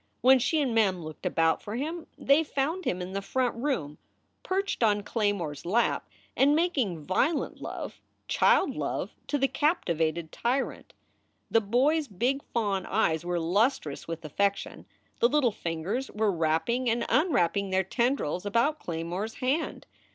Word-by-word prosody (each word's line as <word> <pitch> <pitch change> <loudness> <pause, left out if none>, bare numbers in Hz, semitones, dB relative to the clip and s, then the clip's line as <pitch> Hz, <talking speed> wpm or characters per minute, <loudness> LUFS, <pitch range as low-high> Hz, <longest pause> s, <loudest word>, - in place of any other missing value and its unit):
When 260 +1 +6
she 315 +6 +1
and 255 -4 -1
Mem 195 -6 +2
looked 155 0 -6
about 165 0 +2
for 210 - -6
him 320 +6 -4
they 280 +4 +4
found 315 +5 -2
him 180 0 -1
in 185 +1 -7
the 195 - -2
front 250 +4 0
room, 230 - -2 0.4
perched 390 -3 -2
on 205 -2 +3
Claymore 205 -8 -1
s 145 - -10
lap 215 +8 +1 0.3
and 285 +2 +4
making 255 - 0
violent 285 - 0
love, - - -6 0.3
child - - +3
love, - - -3
to 290 - 0
the 270 0 +2
captivated 170 - 0
tyrant. 255 +3 -2 0.6
The 225 - +4
boy 250 +9 +2
s 310 -3 -2
big 250 +7 0
fawn 200 -5 -1
eyes 165 -6 +1
were 175 0 -1
lustrous 175 - 0
with 165 -1 -6
affection, 200 +6 -1 0.3
the 235 - +4
little 270 -4 +3
fingers 185 +9 -3
were 215 -1 +1
wrap 160 -2 +1
ping 245 +1 0
and 235 +1 0
unwrapping 225 - +2
their 190 0 +2
tendrils 235 - 0
about 235 +9 +1
Claymore 170 +4 -3
s 220 - -9
hand. 275 +5 -1
220 Hz, 160 wpm, -28 LUFS, 175-270 Hz, 0.6 s, When